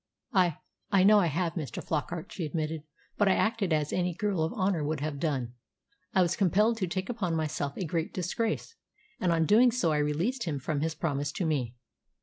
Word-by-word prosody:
"I 180 Hz, -6 st, +3 dB, 0.3 s
I 195 Hz, -2 st, +5 dB
know 210 Hz, +2 st, +7 dB
I 175 Hz, -, +3 dB
have, 165 Hz, +2 st, -1 dB
Mr. 155 Hz, -6 st, -4 dB
Flockart," 165 Hz, +3 st, -3 dB
she 180 Hz, -, -4 dB
admitted. 155 Hz, 0 st, -2 dB, 0.4 s
"But 205 Hz, -, +4 dB
I 190 Hz, -, +5 dB
acted 220 Hz, -5 st, +1 dB
as 150 Hz, -1 st, +1 dB
any 180 Hz, -1 st, 0 dB
girl 200 Hz, -3 st, 0 dB
of 160 Hz, -, 0 dB
honour 185 Hz, -5 st, 0 dB
would 150 Hz, 0 st, -1 dB
have 145 Hz, -1 st, -3 dB
done. 135 Hz, -6 st, -1 dB, 0.6 s
I 185 Hz, -, +6 dB
was 170 Hz, -, 0 dB
compelled 210 Hz, +4 st, +3 dB
to 190 Hz, -4 st, -1 dB
take 185 Hz, +2 st, -3 dB
upon 200 Hz, -9 st, -1 dB
myself 150 Hz, -3 st, -2 dB
a 185 Hz, -, -2 dB
great 165 Hz, 0 st, -2 dB
disgrace, 220 Hz, -, -2 dB, 0.5 s
and 180 Hz, -, +1 dB
on 165 Hz, -1 st, +3 dB
doing 235 Hz, +7 st, +6 dB
so 205 Hz, -9 st, +1 dB
I 150 Hz, -, +2 dB
released 170 Hz, -, 0 dB
him 155 Hz, -4 st, -2 dB
from 145 Hz, +2 st, -2 dB
his 160 Hz, +1 st, -1 dB
promise 145 Hz, -3 st, -1 dB
to 180 Hz, -, -2 dB
me." 130 Hz, -7 st, -1 dB
170 Hz, 205 wpm, -29 LUFS, 155-195 Hz, 0.6 s, know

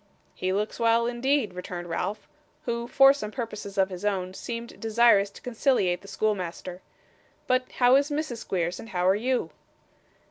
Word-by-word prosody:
'He 185 Hz, -, -2 dB
looks 210 Hz, +5 st, -2 dB
well, 230 Hz, 0 st, +3 dB
indeed,' 240 Hz, -2 st, 0 dB
returned 180 Hz, -1 st, -6 dB
Ralph, 200 Hz, +5 st, -3 dB, 0.4 s
who, 235 Hz, 0 st, -2 dB
for 270 Hz, +2 st, +7 dB
some 245 Hz, -7 st, -5 dB
purposes 210 Hz, -4 st, -6 dB
of 190 Hz, 0 st, +2 dB
his 180 Hz, +1 st, -7 dB
own, 190 Hz, -3 st, -1 dB
seemed 235 Hz, +3 st, -6 dB
desirous 225 Hz, -3 st, +4 dB
to 200 Hz, -, -15 dB
conciliate 230 Hz, -7 st, +1 dB
the 195 Hz, -, -14 dB
schoolmaster. 185 Hz, -3 st, -3 dB, 0.6 s
'But 255 Hz, 0 st, 0 dB
how 250 Hz, 0 st, +5 dB
is 285 Hz, +2 st, +1 dB
Mrs 295 Hz, -4 st, -2 dB
Squeers, 180 Hz, -5 st, -2 dB
and 225 Hz, -, -9 dB
how 180 Hz, -2 st, 0 dB
are 190 Hz, -, +6 dB
you? 240 Hz, -6 st, -1 dB
215 Hz, 165 wpm, -27 LUFS, 190-240 Hz, 0.6 s, for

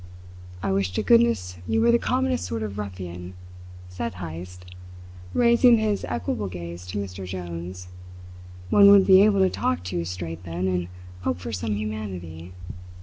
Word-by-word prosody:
"I -, -, 0 dB
wish 95 Hz, -1 st, 0 dB
to -, -, -1 dB
goodness 230 Hz, -, +3 dB
you 225 Hz, -, +1 dB
were 235 Hz, +1 st, +4 dB
the 235 Hz, -, +4 dB
commonest 255 Hz, 0 st, 0 dB
sort 115 Hz, -1 st, -3 dB
of 105 Hz, -1 st, -5 dB
ruffian!" 90 Hz, -2 st, -7 dB, 0.5 s
said 90 Hz, +4 st, -5 dB
Heyst, 90 Hz, +1 st, -8 dB, 0.7 s
raising 235 Hz, 0 st, +5 dB
his 215 Hz, -2 st, 0 dB
equable 115 Hz, -3 st, -2 dB
gaze 85 Hz, -1 st, -8 dB
to 95 Hz, +3 st, -5 dB
Mr. 95 Hz, -2 st, -5 dB
Jones. 90 Hz, 0 st, -6 dB, 0.8 s
"One 200 Hz, -1 st, +8 dB
would 200 Hz, -1 st, +7 dB
be 190 Hz, 0 st, +7 dB
able 200 Hz, -1 st, +4 dB
to 190 Hz, -, +4 dB
talk 85 Hz, +1 st, -1 dB
to 90 Hz, 0 st, -4 dB
you 85 Hz, -, -2 dB
straight 85 Hz, -1 st, -6 dB
then, 90 Hz, +1 st, -3 dB
and 90 Hz, -2 st, -1 dB, 0.3 s
hope 85 Hz, -2 st, -2 dB
for 105 Hz, +6 st, -6 dB
some 105 Hz, +1 st, -2 dB
humanity. 95 Hz, -6 st, -6 dB
95 Hz, 160 wpm, -25 LUFS, -, 0.8 s, One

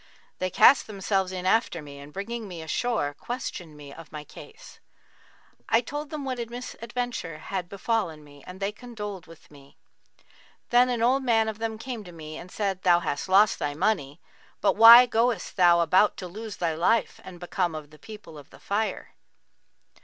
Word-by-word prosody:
They 185 Hz, -, -1 dB
cast 260 Hz, +8 st, +5 dB
themselves 195 Hz, -2 st, -1 dB
in 185 Hz, -1 st, -5 dB
after 190 Hz, -3 st, +2 dB
me 145 Hz, -2 st, -11 dB
and 140 Hz, +1 st, -12 dB
bringing 220 Hz, +5 st, -5 dB
me 175 Hz, -4 st, -8 dB
ashore, 160 Hz, -4 st, -1 dB
questioned 175 Hz, -, -6 dB
me 145 Hz, -1 st, -11 dB
of 165 Hz, -1 st, -13 dB
my 150 Hz, -1 st, -7 dB
case. 440 Hz, -, -14 dB, 0.9 s
I 225 Hz, -, +4 dB
told 290 Hz, +5 st, -6 dB
them 300 Hz, -3 st, -5 dB
what 255 Hz, -2 st, -3 dB
misadventure 240 Hz, -7 st, -5 dB
had 180 Hz, +3 st, -5 dB
befallen 200 Hz, -6 st, -2 dB
me 145 Hz, -1 st, -17 dB
and 180 Hz, +1 st, -10 dB
they 200 Hz, +1 st, -1 dB
condoled 210 Hz, -5 st, -8 dB
with 165 Hz, -2 st, -17 dB
me. 140 Hz, -1 st, -18 dB, 0.9 s
Then 245 Hz, +1 st, +5 dB
an 240 Hz, -2 st, -1 dB
old 260 Hz, +3 st, +3 dB
man 225 Hz, -3 st, +2 dB
of 220 Hz, 0 st, -5 dB
them 225 Hz, -1 st, -3 dB
came 235 Hz, -1 st, -6 dB
to 180 Hz, -, -12 dB
me 155 Hz, -2 st, -9 dB
and 175 Hz, +3 st, -9 dB
said, 195 Hz, -3 st, -2 dB
'Thou 175 Hz, -2 st, +4 dB
hast 145 Hz, +3 st, -3 dB
lost 195 Hz, +2 st, +4 dB
thy 145 Hz, 0 st, -2 dB
money, 155 Hz, -4 st, -1 dB, 0.4 s
but -, -, +2 dB
why 235 Hz, +2 st, +10 dB
goest 235 Hz, -3 st, 0 dB
thou 175 Hz, -2 st, +5 dB
about 185 Hz, +5 st, +3 dB
to 185 Hz, -, -6 dB
lose 215 Hz, +4 st, -8 dB
thy 170 Hz, -2 st, -1 dB
life 185 Hz, +8 st, +1 dB
and 180 Hz, -2 st, -11 dB
become 175 Hz, -1 st, -2 dB
of 150 Hz, -1 st, -8 dB
the 155 Hz, -, -17 dB
people 210 Hz, -5 st, -11 dB
of 140 Hz, -, -16 dB
The -, -, -16 dB
Fire? 215 Hz, +2 st, -3 dB
195 Hz, 185 wpm, -26 LUFS, 165-230 Hz, 0.9 s, why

